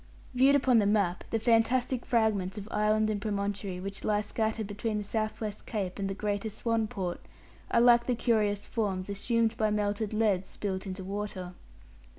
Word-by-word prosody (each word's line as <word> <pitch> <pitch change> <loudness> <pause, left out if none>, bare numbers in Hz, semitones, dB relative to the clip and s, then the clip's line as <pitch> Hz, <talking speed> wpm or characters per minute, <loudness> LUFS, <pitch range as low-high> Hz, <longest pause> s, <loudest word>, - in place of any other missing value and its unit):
Viewed 265 +3 +5
upon 255 -4 +4
the 205 - +2
map, 200 -4 +1
the 225 - +1
fantastic 240 +2 +2
fragments 215 -5 +1
of 205 0 -6
island 215 +1 +2
and 205 -1 -2
promontory 200 -2 -2
which 195 +1 -6
lie 210 -1 +2
scattered 220 +1 -1
between 210 +2 -3
the 210 - -2
South 215 +1 -2
West 210 -2 -5
Cape 200 -4 -3
and 195 0 -1
the 195 - -3
greater 205 +1 -2
Swan 225 +1 -1
Port, 185 -4 -4 0.5
are - - +3
like 240 0 +6
the 250 - +2
curious 210 -4 +1
forms 200 -5 -2
assumed 230 +2 +1
by 215 -1 +2
melted 210 0 -1
lead 210 -4 +1
spilt 195 -1 -4
into 190 0 -5
water. 195 -2 -5
210 Hz, 175 wpm, -29 LUFS, 200-225 Hz, 0.5 s, like